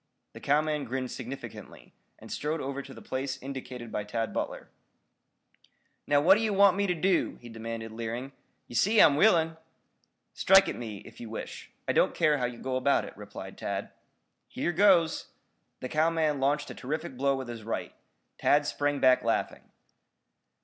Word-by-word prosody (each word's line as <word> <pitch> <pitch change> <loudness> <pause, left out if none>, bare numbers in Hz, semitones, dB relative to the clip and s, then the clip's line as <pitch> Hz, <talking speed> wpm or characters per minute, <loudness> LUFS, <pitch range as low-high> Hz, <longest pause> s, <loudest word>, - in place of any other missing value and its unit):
The - - -10
cowman 150 0 +1
grinned 130 +1 -3
significantly, 135 +1 -9 0.2
and - - -12
strode 155 +2 -2
over 140 0 -4
to 140 - -12
the - - -11
place 130 0 -3
indicated 125 -3 -7
by 105 - -2
Tad 115 +2 -3
Butler. - - -4 1.4
"Now 145 0 +4
what 190 +7 +6
d'ye 225 -1 0
want 200 -1 +5
me 200 0 +1
ter 180 - +1
do?" 180 +2 +1
he 120 - -11
demanded, 115 0 -6
leering. 115 +4 -5 0.4
"Yer - - -12
see 210 - +3
I'm 145 - +7
willing?" 165 -2 +4 0.8
"Strike 195 +1 +6
at - - -2
me, 105 -4 -7
if - - -13
you 115 - -7
wish. 110 - -7 0.2
I - - +1
don't - - +3
care 150 -3 +3
how 125 - +1
you 120 -1 -4
go 130 +1 -2
about 140 +2 +2
it," - - -10
replied - - -9
Tad. - - -4 0.6
"Here 175 - -2
goes!" 175 -3 +4 0.5
The 130 - -3
cowman 155 -2 +1
launched 140 +2 0
a - - -6
terrific 155 +2 -4
blow 140 +2 +1
with 130 -2 -5
his 120 -1 -7
right. 115 +1 -4 0.5
Tad 145 0 +3
sprang 145 0 -1
back 130 -1 +5
laughing. - - -1
140 Hz, 170 wpm, -29 LUFS, 125-160 Hz, 1.4 s, I'm